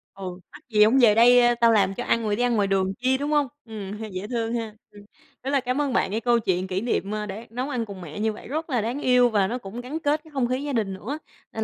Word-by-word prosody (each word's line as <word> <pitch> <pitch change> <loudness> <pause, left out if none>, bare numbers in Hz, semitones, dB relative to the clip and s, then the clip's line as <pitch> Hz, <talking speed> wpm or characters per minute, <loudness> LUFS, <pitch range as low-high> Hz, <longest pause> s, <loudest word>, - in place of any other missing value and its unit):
Ừ, 185 -2 -7
mắc - - -13
gì 210 -1 +5
hổng 230 +5 +4
về 215 -3 +6
đây 240 +1 +6
tao 230 0 +6
làm 195 -3 +3
cho 245 - -4
ăn 230 - +1
rồi 210 -1 0
đi 245 - 0
ăn 245 -1 +2
ngoài 200 -2 +2
đường 190 -1 +1
chi, 260 +1 +2
đúng 290 +2 -3
hông? 295 -2 +3 0.2
Ừm, 210 -2 -7
dễ 185 +3 -5
thương 230 -2 -2
ha. 225 -3 -3 0.2
Ừm, 205 0 -14 0.4
rất 270 - -3
là 280 - +3
cám 255 +3 -1
ơn 275 -4 -1
bạn 195 - +1
cái 220 - 0
câu 240 0 +3
chuyện 185 -3 -1
kỷ 190 +1 -2
niệm, 210 -4 -1
ơ, 210 0 -2
đã 210 +4 -7
nấu 250 +5 -4
ăn 240 -5 -2
cùng 195 -3 -9
mẹ 160 +3 -8
như 220 0 0
vậy - - -11
rất 315 +4 -4
là 245 -5 +1
đáng 240 +6 -3
yêu 250 -1 +4
và 200 -3 +2
nó 245 - -2
cũng 235 +1 -8
gắn 290 +6 -5
kết 300 0 0
cái 315 - -17
không 260 -4 0
khí 255 +3 -2
gia 285 -2 -3
đình 210 -5 -1
nữa, 265 +11 -5 0.3
nên 220 - -2
230 Hz, 295 wpm, -24 LUFS, 205-255 Hz, 0.4 s, về